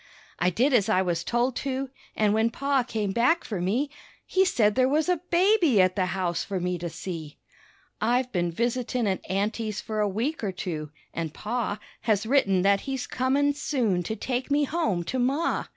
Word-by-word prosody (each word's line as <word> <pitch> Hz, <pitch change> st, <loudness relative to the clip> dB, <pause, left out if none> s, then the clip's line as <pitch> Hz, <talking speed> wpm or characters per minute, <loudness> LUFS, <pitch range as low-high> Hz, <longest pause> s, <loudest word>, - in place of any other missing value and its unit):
I 180 Hz, -, +3 dB
did 250 Hz, -, +2 dB
as 225 Hz, -3 st, +3 dB
I 190 Hz, -3 st, +3 dB
was 170 Hz, -2 st, -1 dB
told 240 Hz, +1 st, 0 dB
to, 270 Hz, -1 st, -3 dB, 0.2 s
an' 210 Hz, -1 st, +2 dB
when 220 Hz, +1 st, +3 dB
Pa 275 Hz, +3 st, +1 dB
came 220 Hz, -5 st, -2 dB
back 250 Hz, -, +2 dB
for 200 Hz, -6 st, -4 dB
me 240 Hz, +11 st, 0 dB, 0.3 s
He 380 Hz, 0 st, +3 dB
said 215 Hz, -, +3 dB
there 255 Hz, +2 st, +3 dB
was 305 Hz, +3 st, +2 dB
a 360 Hz, -3 st, +1 dB
baby 345 Hz, -, +4 dB
at 185 Hz, 0 st, +4 dB
the 185 Hz, -3 st, +1 dB
house 180 Hz, -2 st, -1 dB
for 195 Hz, -2 st, -3 dB
me 180 Hz, 0 st, -2 dB
to 170 Hz, +1 st, -4 dB
see. 160 Hz, -4 st, -7 dB, 0.6 s
I've 245 Hz, +3 st, +1 dB
been 175 Hz, -2 st, 0 dB
visitin' 240 Hz, +4 st, -1 dB
at 190 Hz, -2 st, 0 dB
aunty's 210 Hz, +2 st, -1 dB
for 215 Hz, -1 st, -4 dB
a 210 Hz, -1 st, +2 dB
week 235 Hz, +9 st, -2 dB
or 200 Hz, -, 0 dB
two, 165 Hz, -5 st, -5 dB, 0.2 s
an' 165 Hz, -1 st, -2 dB
Pa 215 Hz, +5 st, -3 dB, 0.2 s
Has 215 Hz, -2 st, +1 dB
written 205 Hz, -8 st, +3 dB
that 200 Hz, 0 st, +4 dB
he's 265 Hz, -2 st, -2 dB
comin' 275 Hz, +3 st, +1 dB
soon 250 Hz, -, 0 dB
to 220 Hz, +6 st, -3 dB
take 250 Hz, +4 st, -3 dB
me 290 Hz, +1 st, +3 dB
home 285 Hz, -, 0 dB
to 260 Hz, +9 st, -3 dB
Ma. 275 Hz, +7 st, +1 dB
225 Hz, 195 wpm, -26 LUFS, 190-265 Hz, 0.6 s, baby